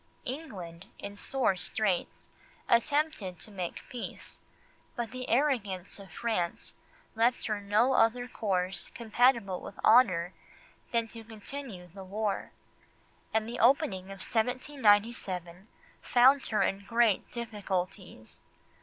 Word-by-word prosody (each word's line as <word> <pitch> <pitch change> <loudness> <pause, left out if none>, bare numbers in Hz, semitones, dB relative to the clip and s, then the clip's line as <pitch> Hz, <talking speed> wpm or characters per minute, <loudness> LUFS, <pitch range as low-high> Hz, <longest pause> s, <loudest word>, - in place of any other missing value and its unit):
England, 195 - -7
in 200 0 -7
sore 250 -1 +1
straits, 185 +1 -2 0.4
attempted 235 - +1
to 215 - -6
make 185 -4 -5
peace, 245 -2 -8 0.5
but 235 -2 -3
the 255 0 -6
arrogance 215 -10 0
of 195 -1 -11
France 220 -8 -2 0.4
left 235 +2 +2
her 210 -2 -1
no 215 +6 +3
other 245 0 +3
course 190 -5 -1
compatible 235 -4 +2
with 200 - -9
honour 185 -7 +5 0.6
than 230 -1 +1
to 225 0 -9
continue 220 -2 -8
the 195 -1 -9
war, 205 +1 -2 0.8
and 220 0 +1
the 240 +1 -5
opening 235 -6 +3
of 195 -1 -7
1797 215 - +1 0.3
found 260 +3 +5
her 215 - +2
in 195 +1 -1
great 230 -1 +2
difficulties. 190 - -4
220 Hz, 115 wpm, -30 LUFS, 190-245 Hz, 0.8 s, honour